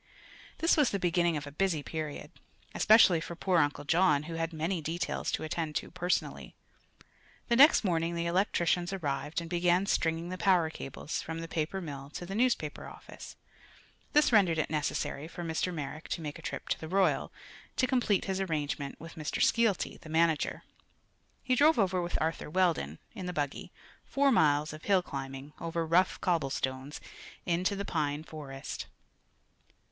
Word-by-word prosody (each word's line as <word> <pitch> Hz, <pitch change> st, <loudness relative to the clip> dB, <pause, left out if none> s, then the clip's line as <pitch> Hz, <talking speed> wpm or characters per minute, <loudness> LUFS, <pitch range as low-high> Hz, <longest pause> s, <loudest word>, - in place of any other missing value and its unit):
This 330 Hz, +1 st, +3 dB
was 295 Hz, -5 st, +4 dB
the 200 Hz, -, -1 dB
beginning 175 Hz, -2 st, +1 dB
of 145 Hz, -, -5 dB
a 145 Hz, -, -8 dB
busy 160 Hz, -1 st, 0 dB
period, 155 Hz, -2 st, -5 dB, 0.4 s
especially 210 Hz, -6 st, +6 dB
for 170 Hz, -, -6 dB
poor 180 Hz, 0 st, +2 dB
Uncle 145 Hz, -1 st, +1 dB
John, 150 Hz, -1 st, +3 dB
who 165 Hz, +2 st, -7 dB
had 165 Hz, 0 st, -2 dB
many 165 Hz, +2 st, -2 dB
details 165 Hz, +3 st, -2 dB
to -, -, -1 dB
attend 155 Hz, -1 st, -3 dB
to -, -, -3 dB
personally. 180 Hz, +1 st, -2 dB, 0.9 s
The 235 Hz, -, +4 dB
next 285 Hz, +2 st, +7 dB
morning 170 Hz, -3 st, 0 dB
the 170 Hz, 0 st, -1 dB
electricians 175 Hz, 0 st, +1 dB
arrived 145 Hz, -5 st, -2 dB
and 165 Hz, -, -7 dB
began 175 Hz, +2 st, +2 dB
stringing 165 Hz, -2 st, 0 dB
the 185 Hz, 0 st, -5 dB
power 180 Hz, -5 st, +3 dB
cables 135 Hz, 0 st, -5 dB
from 160 Hz, 0 st, -5 dB
the 165 Hz, -, -5 dB
paper 165 Hz, +4 st, -2 dB
mill 140 Hz, -4 st, -7 dB
to 175 Hz, -, -5 dB
the 190 Hz, -, -6 dB
newspaper 225 Hz, -10 st, 0 dB
office. -, -, -11 dB, 0.8 s
This 300 Hz, -2 st, +5 dB
rendered 190 Hz, -7 st, +4 dB
it 155 Hz, -, -1 dB
necessary 150 Hz, -1 st, -2 dB
for 175 Hz, +1 st, -7 dB
Mr. 165 Hz, +2 st, -1 dB
Merrick 155 Hz, -1 st, -6 dB
to 170 Hz, -, -2 dB
make 150 Hz, 0 st, -6 dB
a -, -, -11 dB
trip -, -, -5 dB
to 160 Hz, -, -2 dB
Royal, 190 Hz, +2 st, +1 dB, 0.4 s
to 255 Hz, -, +2 dB
complete 250 Hz, -6 st, +1 dB
his 190 Hz, 0 st, -1 dB
arrangement 150 Hz, -5 st, -3 dB
with 165 Hz, +2 st, -10 dB
Mr. 155 Hz, -3 st, -4 dB
Skeelty, 230 Hz, -5 st, +2 dB
the 160 Hz, -, -13 dB
manager. 160 Hz, -1 st, +1 dB, 0.8 s
He 260 Hz, -, +1 dB
drove 295 Hz, +3 st, +5 dB
over 190 Hz, -4 st, +2 dB
with 175 Hz, 0 st, -2 dB
Arthur 160 Hz, -1 st, -2 dB
Weldon, 160 Hz, -, +1 dB, 0.2 s
in 190 Hz, -5 st, -6 dB
the 180 Hz, -, -3 dB
buggy 145 Hz, -4 st, -3 dB, 0.4 s
four 280 Hz, 0 st, +3 dB
miles 150 Hz, -, +3 dB
of 155 Hz, -, -10 dB
hill 195 Hz, -3 st, +3 dB
climbing, 135 Hz, 0 st, -7 dB
over 165 Hz, 0 st, -2 dB
rough 175 Hz, +3 st, +3 dB
cobble 165 Hz, -6 st, +1 dB
stones, 135 Hz, +2 st, -4 dB, 0.4 s
into 180 Hz, +3 st, +1 dB
the 200 Hz, 0 st, -4 dB
pine 150 Hz, -3 st, -1 dB
forest. 140 Hz, -4 st, -7 dB
165 Hz, 170 wpm, -30 LUFS, 155-185 Hz, 0.9 s, next